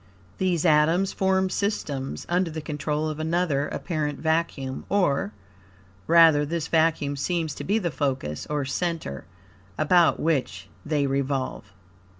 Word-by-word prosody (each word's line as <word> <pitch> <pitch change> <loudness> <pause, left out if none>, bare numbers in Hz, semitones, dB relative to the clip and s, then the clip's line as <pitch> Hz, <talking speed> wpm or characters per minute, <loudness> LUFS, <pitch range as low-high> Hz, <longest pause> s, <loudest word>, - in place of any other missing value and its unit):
These 180 -3 +1
atoms 165 +4 +3
form 190 -1 +1
systems, 145 -10 -3
under 180 0 +1
the 160 0 -5
control 150 0 -2
of 155 0 -4
another 160 -3 0
apparent 150 -4 -3
vacuum; 160 -5 -1
or, 145 - +1 0.8
rather, 165 -3 +6
this 160 +1 -3
vacuum 160 -3 +1
seems 160 +1 -1
to - - -7
be 205 +3 +1
the 175 -6 -1
focus, 130 - -2
or 145 -2 -1
center, 160 - -3 0.5
about 170 +2 +4
which 155 -5 -1
they 145 -2 0
revolve. 135 -6 -2
155 Hz, 130 wpm, -25 LUFS, 140-170 Hz, 0.8 s, rather